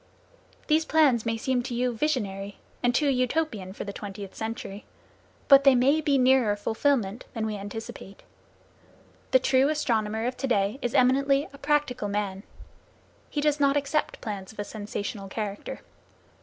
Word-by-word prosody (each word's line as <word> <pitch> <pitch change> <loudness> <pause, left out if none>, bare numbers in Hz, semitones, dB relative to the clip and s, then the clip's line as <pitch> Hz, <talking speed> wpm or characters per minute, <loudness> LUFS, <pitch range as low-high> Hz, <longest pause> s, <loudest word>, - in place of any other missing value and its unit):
These 315 +1 +3
plans 275 -9 +3
may 225 0 0
seem 250 +2 0
to 245 0 -5
you 250 0 0
visionary, 205 -8 -2 0.2
and 245 -1 +2
too 295 - +2
Utopian 250 -6 -1
for 195 - -6
the 200 - -6
twentieth 200 -1 -7
century. 220 -2 -6 0.6
But 275 -1 +8
they 275 -2 +6
may 275 +5 +3
be 290 -3 +2
nearer 255 -5 +4
fulfilment 220 0 0
than 225 -1 -1
we 215 -1 -2
anticipate. 200 -1 -8 1.1
The - - +6
true 260 +2 +3
astronomer 225 -7 0
of 250 +1 -1
to 270 - -2
day 205 +1 +1
is 245 - -2
eminently 275 +3 +3
a 280 - -13
practical 285 -6 0
man. 200 -1 -2 0.9
He 295 - -2
does 300 0 +1
not 280 0 +3
accept 285 +2 -1
plans 200 -3 -5
of 220 - -19
a 205 - -2
sensational 205 -1 -5
character. 205 0 -5
245 Hz, 155 wpm, -27 LUFS, 205-275 Hz, 1.1 s, But